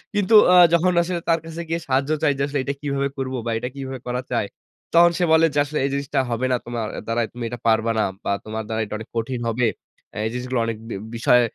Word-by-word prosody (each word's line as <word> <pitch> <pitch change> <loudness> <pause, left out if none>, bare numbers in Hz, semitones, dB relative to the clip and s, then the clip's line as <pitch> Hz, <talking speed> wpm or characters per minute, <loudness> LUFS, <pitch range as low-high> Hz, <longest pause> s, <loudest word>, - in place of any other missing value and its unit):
কিন্তু 205 +1 +1 0.2
আ - - +7 0.2
যখন 175 +2 +4
আসলে 175 0 -2
তার 165 0 +4
কাছে 165 +1 -6
গিয়ে 165 +1 0
সাহায্য 135 +2 +1
চাই 145 - +4
যে, - - -3
আসলে 145 -1 -2
এইটা 140 - -2
কিভাবে 140 -1 -1
করবো 130 -1 -3
বা, 120 - -2
এইটা 125 +2 -3
কিভাবে 135 -2 -6
করা 125 +1 -1
যায়? 115 -4 0 0.5
তখন 170 +1 +7
সে - - +2
বলে 160 0 +6
যে 145 - +2
আসলে 150 +1 -4
এই - - 0
জিনিসটা 140 0 -1
হবে 120 +2 -1
না 125 - +4
তোমার 120 -2 -3
এ - - -5
দ্বারায়, 115 0 0
তুমি 120 0 -6
এইটা 120 0 -6
পারবা 110 0 +3
না। - - +3 0.2
বা, - - -3 0.2
তোমার 110 +1 -4
দ্বারা 110 0 -2
এইটা 105 - -7
অনেক 110 - -10
কঠিন 120 +2 -2
হবে। 120 +1 +1 0.5
অ্যা - - -7
এই - - 0
জিনিসগুলো 125 0 -2
অনেক 115 -1 -3
বি - - -4 0.2
বিষয় 125 +1 +4
130 Hz, 250 wpm, -22 LUFS, 115-145 Hz, 0.5 s, আ